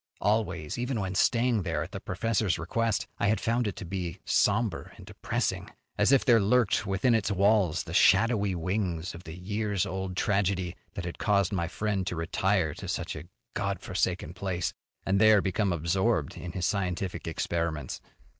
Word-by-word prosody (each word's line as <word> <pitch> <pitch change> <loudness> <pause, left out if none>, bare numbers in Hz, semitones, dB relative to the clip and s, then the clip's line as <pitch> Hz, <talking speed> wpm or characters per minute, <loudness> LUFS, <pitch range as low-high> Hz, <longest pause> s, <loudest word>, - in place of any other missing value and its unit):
Always, 95 -6 0
even 125 -1 -1
when 95 -2 -2
staying 115 +3 +2
there 85 -3 -1
at - - -9
the - - -5
professor's 105 0 0
request, 115 +6 -1
I 100 - +2
had 110 +2 +2
found 115 0 0
it 100 - -3
to - - -7
be 90 -2 -4
somber 110 +1 +1
and - - -12
depressing, - - -2 0.3
as - - +3
if 135 - +4
there 120 -4 +6
lurked 105 0 +2
within 100 +5 +2
its 110 -2 +1
walls 100 -3 +3
the - - -8
shadowy 100 -1 +4
wings 90 0 -2
of 85 - -11
the 80 +2 -8
years 100 +1 -1
old 95 -1 -4
tragedy 95 -3 0 0.2
that 95 -5 -4
had 85 - -6
caused 100 -3 +2
my 85 -3 0
friend 100 0 -2
to - - -2
retire 85 0 0
to - - -8
such - - -3
a 80 +1 -7 0.3
God - - -2
forsaken - - -2
place, 90 -3 -2 0.3
and 100 +1 +2
there 110 -1 +7
become 100 +1 0
absorbed 85 +1 0
in 90 -1 -7
his 90 -2 -2
scientific 90 -3 -2
experiments. 80 -3 -2
95 Hz, 175 wpm, -28 LUFS, 90-110 Hz, 0.3 s, there